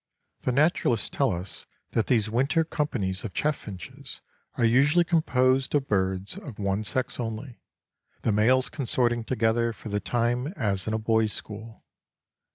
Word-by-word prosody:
The - - -1
naturalists 125 -5 +2
tell 135 -2 +2
us 90 +2 -5 0.2
that 115 - +1
these 110 -4 +3
winter 135 +9 +2
companies 125 - -2
of 105 -7 -6
chaffinches 105 - -4 0.4
are 120 - +3
usually 140 +9 +5
composed 135 -6 +2
of 140 -2 +1
birds 95 - 0
of 135 - -9
one 100 +1 -1
sex 130 +5 -1
only, 115 +2 -5 0.6
the 115 - +2
males 125 +5 +4
consorting 120 -3 0
together 115 0 +1
for 110 - -9
the 105 0 0
time 120 +4 0
as 100 -4 0
in 110 - 0
a - - +1
boys' 110 -1 +1
school. 110 +1 -8
115 Hz, 150 wpm, -27 LUFS, 105-130 Hz, 0.6 s, usually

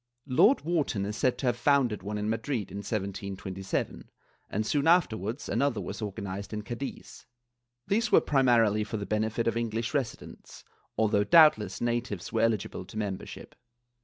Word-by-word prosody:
Lord 175 - +4
Wharton 150 - -1
is 105 +1 -4
said 125 +3 +1
to 130 - -4
have 120 -2 +2
founded 130 -6 +2
one 105 +2 -4
in 105 0 -2
Madrid, 115 +1 -2
in - - -6
1727, 100 -2 -4 0.4
and 110 +2 -2
soon 140 +4 0
afterwarcis 120 - +2
another 125 -2 0
was 95 - -6
organized 100 -1 -5
in 105 0 -4
Cadiz. 120 +5 -7 0.6
These 220 +2 0
were - - +7
primarily 120 -6 +3
for 110 +1 -4
the 100 - -4
benefit 110 +2 -1
of 115 - +1
English 115 +1 -2
residents, 135 -5 -5 0.3
although 105 -2 +3
doubt 155 +3 +7
less 100 -3 -6
natives 120 -6 -2
were 115 - +1
eligible 110 -5 0
to 110 - -10
membership. 100 -3 -5
110 Hz, 160 wpm, -28 LUFS, 105-130 Hz, 0.6 s, were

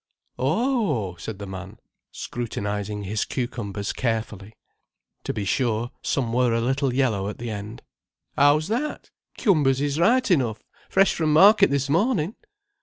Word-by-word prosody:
"Oh," 155 - 0
said 110 +2 -7
the 100 - -7
man, 95 0 -8 0.3
scrutinizing 105 -3 -4
his 105 +2 -1
cucumbers 110 -6 -4
carefully. 110 -3 -3 0.7
To - - -1
be 105 -2 -4
sure, 120 +2 0
some 120 -5 -1
were 125 -1 +2
a - - +1
little 135 +3 0
yellow 115 -7 0
at 105 - -7
the 120 -1 -5
end. 105 +1 -7 0.5
"How's 145 +2 +4
that? 275 +7 -3 0.3
Cumbers 145 - +3
is 145 +1 -1
right 245 +6 +3
enough: 120 -10 +1 0.3
fresh 195 +1 +4
from 155 -2 0
market 195 +6 +7
this 140 0 0
morning." 180 - +1
125 Hz, 140 wpm, -24 LUFS, 105-155 Hz, 0.7 s, market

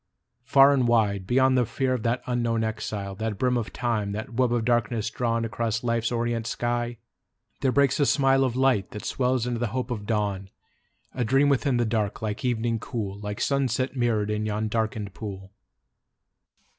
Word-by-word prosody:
Far 140 +2 +6
and 130 -3 +2
wide, 100 -5 +2
Beyond 130 +1 +3
the 125 - +4
fear 130 +3 -1
of 125 - -2
that 115 +2 -1
unknown 120 -2 0
exile, 110 -3 -3
That 110 +1 -3
brim 125 +3 +1
of 115 -2 -2
Time, 110 -5 -1
that 110 +3 -5
web 125 0 +2
of 120 -2 0
darkness 115 -2 0
drawn 115 -1 -1
Across 110 +1 -2
Life's 115 -1 0
orient 115 -1 -1
sky, 120 0 -2 0.6
there 135 -1 +1
breaks 140 +1 +3
a 145 - +3
smile 135 -2 +3
Of 125 -3 0
light 130 -7 +2
that 105 - -7
swells 125 -2 0
into 120 -1 -2
the 120 - 0
hope 125 0 -2
of 105 -4 -4
dawn: 100 -3 -1 0.6
A 125 - -1
dream 135 +5 +3
within 135 -2 +2
the 120 - +2
dark, 110 -2 -1
like 110 +3 -4
evening 115 -2 0
cool, 105 -4 -5
Like 105 0 -5
sunset 135 -1 0
mirror'd 110 -4 +1
in 105 0 -1
yon 105 +1 -1
darken'd 110 -3 -2
pool. 95 -3 -7
115 Hz, 180 wpm, -26 LUFS, 110-125 Hz, 0.6 s, Far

